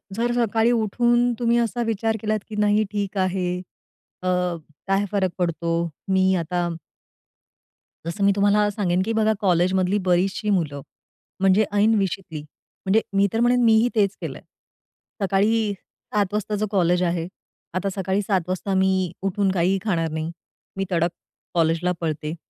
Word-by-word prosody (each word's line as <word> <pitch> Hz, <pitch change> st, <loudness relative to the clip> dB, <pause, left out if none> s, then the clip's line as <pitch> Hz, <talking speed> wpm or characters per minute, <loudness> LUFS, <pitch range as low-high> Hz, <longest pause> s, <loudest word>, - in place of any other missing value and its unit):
जर 235 Hz, +2 st, 0 dB
सकाळी 225 Hz, +2 st, +2 dB
उठून 240 Hz, +2 st, +2 dB
तुम्ही 235 Hz, 0 st, +2 dB
असा 235 Hz, +1 st, -1 dB
विचार 225 Hz, 0 st, 0 dB
केलात, 215 Hz, 0 st, 0 dB
की 215 Hz, -, -6 dB
नाही 210 Hz, +1 st, +3 dB
ठीक 200 Hz, -1 st, -3 dB
आहे 185 Hz, -1 st, 0 dB, 0.6 s
अ, 185 Hz, -, -4 dB, 0.6 s
काय 195 Hz, +1 st, +2 dB
फरक 190 Hz, -3 st, +1 dB
पडतो? 170 Hz, -1 st, -1 dB, 0.3 s
मी 190 Hz, 0 st, +3 dB
आता 175 Hz, +1 st, -1 dB, 1.4 s
जसं 195 Hz, +4 st, -3 dB
मी 200 Hz, -, +5 dB
तुम्हाला 205 Hz, +1 st, +3 dB
सांगेन, 185 Hz, -3 st, 0 dB
की 220 Hz, +4 st, -1 dB
बघा 220 Hz, 0 st, +2 dB
कॉलेजमधली 185 Hz, +1 st, +2 dB
बरीचशी 190 Hz, +4 st, +1 dB
मुलं 155 Hz, -8 st, 0 dB, 0.6 s
म्हणजे 195 Hz, +2 st, +4 dB
ऐन 210 Hz, +2 st, +4 dB
विशीतली 185 Hz, -5 st, -3 dB, 0.4 s
म्हणजे 210 Hz, +4 st, +3 dB, 0.2 s
मी 200 Hz, -, +4 dB
तर 225 Hz, -, 0 dB
म्हणेन 245 Hz, +1 st, +3 dB
मीही 225 Hz, +1 st, +5 dB
तेच 200 Hz, -2 st, +2 dB
केलंय. -, -, -6 dB, 0.8 s
सकाळी 205 Hz, +2 st, +2 dB, 0.4 s
7 205 Hz, -2 st, +1 dB
वाजताच 210 Hz, 0 st, -1 dB
कॉलेज 180 Hz, -2 st, +2 dB
आहे. 170 Hz, -1 st, -1 dB, 0.5 s
आता 190 Hz, +2 st, -1 dB
सकाळी 190 Hz, +1 st, 0 dB
7 195 Hz, -2 st, +1 dB
वाजता 185 Hz, +2 st, -2 dB
मी 190 Hz, -2 st, +2 dB
उठून 195 Hz, 0 st, +1 dB
काहीही 185 Hz, +1 st, +2 dB
खाणार 165 Hz, -5 st, 0 dB
नाही. 160 Hz, +1 st, -3 dB, 0.5 s
मी 195 Hz, -, -1 dB
तडक 170 Hz, 0 st, +2 dB, 0.4 s
कॉलेजला 165 Hz, +1 st, +1 dB
पळते. 155 Hz, 0 st, -3 dB
195 Hz, 145 wpm, -23 LUFS, 180-215 Hz, 1.4 s, मी